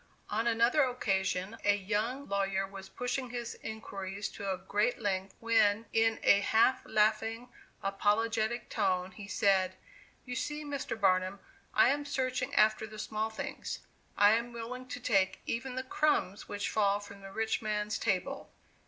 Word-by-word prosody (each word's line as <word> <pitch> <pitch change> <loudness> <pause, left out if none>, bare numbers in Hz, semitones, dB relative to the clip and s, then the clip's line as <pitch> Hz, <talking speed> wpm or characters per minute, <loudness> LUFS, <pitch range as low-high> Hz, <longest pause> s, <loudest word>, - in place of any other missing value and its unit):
On 225 +3 0
another 235 +5 +4
occasion, 195 -4 -1
a 205 0 +4
young 220 +7 -2
lawyer 195 -1 0
was 195 0 -10
pushing 250 +1 -3
his 240 -1 -4
inquiries 200 -2 -5
to 200 -1 -4
a 190 - -1
great 205 +5 0
length, 195 -3 -2
when, 225 -1 +3
in 225 0 +3
a 200 - +6
half 225 +5 +3
laughing, 220 +2 +1 0.3
apologetic 220 +3 +1
tone, 185 -3 0
he 195 +2 -9
said: 190 -2 +2 0.5
"You 250 -1 -5
see, 300 +3 -3
Mr. 280 -5 -4
Barnum, 185 0 +2 0.4
I - - +6
am 290 +1 0
searching 260 -2 -1
after 215 +1 +4
the 215 0 -10
small 215 +1 -2
things; 220 - -5 0.4
I 205 0 +7
am 235 +2 +1
willing 250 +2 -6
to 250 - -5
take 200 -6 +2
even 250 +2 -3
the 260 - -2
crumbs 260 -8 0
which 205 0 -2
fall 205 -1 +2
from 200 -1 -11
the 195 0 -9
rich 220 +2 -1
man's 210 -1 -1
table!" - - -1
215 Hz, 155 wpm, -32 LUFS, 200-240 Hz, 0.5 s, I